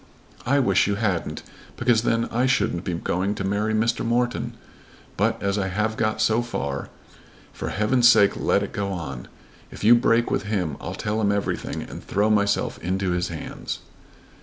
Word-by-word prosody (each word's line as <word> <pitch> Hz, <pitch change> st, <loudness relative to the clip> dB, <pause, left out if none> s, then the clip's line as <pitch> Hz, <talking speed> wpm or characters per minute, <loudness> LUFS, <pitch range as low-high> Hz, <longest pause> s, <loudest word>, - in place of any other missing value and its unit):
"I 140 Hz, +3 st, +3 dB
wish 100 Hz, -10 st, +3 dB
you 100 Hz, -, +1 dB
hadn't, 100 Hz, -5 st, -2 dB, 0.3 s
because 120 Hz, -2 st, +3 dB
then 115 Hz, 0 st, +1 dB
I 125 Hz, +3 st, +2 dB
shouldn't 95 Hz, -9 st, +1 dB
be 90 Hz, -, -1 dB
going 95 Hz, +4 st, -1 dB
to -, -, -4 dB
marry 100 Hz, +3 st, 0 dB
Mr. 115 Hz, +2 st, +1 dB
Morton. 120 Hz, 0 st, 0 dB, 0.6 s
But, -, -, +1 dB
as 100 Hz, +1 st, 0 dB
I 95 Hz, -, 0 dB
have 105 Hz, +3 st, -1 dB
got 110 Hz, -1 st, 0 dB
so 110 Hz, +2 st, +3 dB
far, 70 Hz, -12 st, -4 dB, 0.6 s
for -, -, -4 dB
heaven's 120 Hz, +4 st, +3 dB
sake 105 Hz, -4 st, +6 dB
let -, -, +1 dB
it -, -, -5 dB
go 100 Hz, -1 st, -2 dB
on. 75 Hz, -9 st, -6 dB, 0.4 s
If -, -, -10 dB
you 115 Hz, +3 st, +8 dB
break 120 Hz, -1 st, +3 dB
with -, -, +1 dB
him 95 Hz, -8 st, -1 dB
I'll -, -, -5 dB
tell 110 Hz, +1 st, -2 dB
him 100 Hz, -1 st, +2 dB
everything 100 Hz, 0 st, -2 dB
and -, -, -9 dB
throw 105 Hz, +2 st, +1 dB
myself 100 Hz, -1 st, +1 dB
into 95 Hz, +1 st, -1 dB
his 90 Hz, 0 st, 0 dB
hands." 80 Hz, -2 st, -6 dB
105 Hz, 180 wpm, -24 LUFS, 95-115 Hz, 0.6 s, you